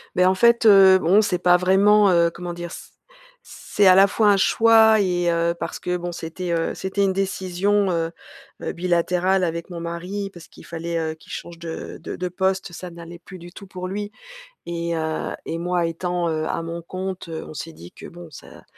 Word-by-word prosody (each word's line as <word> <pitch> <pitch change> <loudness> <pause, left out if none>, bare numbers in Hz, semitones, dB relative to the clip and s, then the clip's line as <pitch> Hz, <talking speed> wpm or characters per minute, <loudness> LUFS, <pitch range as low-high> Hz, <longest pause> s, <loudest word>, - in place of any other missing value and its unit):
Beh, 180 - +4
en 185 - +4
fait, 235 +3 +3
heu 195 -2 +8
bon, 190 +4 +4
c'est 180 -4 -1
pas 180 0 +4
vraiment, 200 +3 +4
heu 170 -1 +3
comment 175 0 -7
dire? 175 0 -7
C - - -11 0.6
c'est, 205 - -1
à 185 - +8
la 195 +1 +7
fois 210 +1 +2
un 200 - +4
choix 220 +1 +5
et 175 -2 0
heu, 170 0 +1
parce - - -4
que 180 0 -2
bon, 175 0 -5
c'était, 170 +2 -5
heu, 165 -1 -1
c'était 195 +1 -2
une 195 - +2
décision, 195 +1 0
heu 165 -1 -1 0.5
heu, - - -3
bilatérale 180 +2 0
avec 170 0 -3
mon 170 -2 -7
mari, 180 +4 -5
parce 170 -1 -13
qu'il - - -16
fallait, 170 0 -4
heu, 160 -1 -2
qu'il - - -13
change 170 -1 -8
de 165 -1 -7
de - - -6
de 180 - -3
poste, 190 0 -1
ça 180 +1 -8
n'allait 170 0 -11
plus 185 +2 -12
du 175 +1 -12
tout 195 +1 -12
pour 185 0 -7
lui 205 +2 -5 0.5
et 170 0 -3
heu 160 -1 -3 0.2
et 165 - -3
moi 175 0 -1
étant, 175 +1 -2
heu, 155 -1 -2
à - - -2
mon 170 +1 -6
compte, 185 +1 -6
heu, 160 - -6
on - - -10
s'est 165 +2 -7
dit 85 - -13
que, - - -14
bon, 175 0 -11
ça - - -14
180 Hz, 215 wpm, -22 LUFS, 170-190 Hz, 0.6 s, heu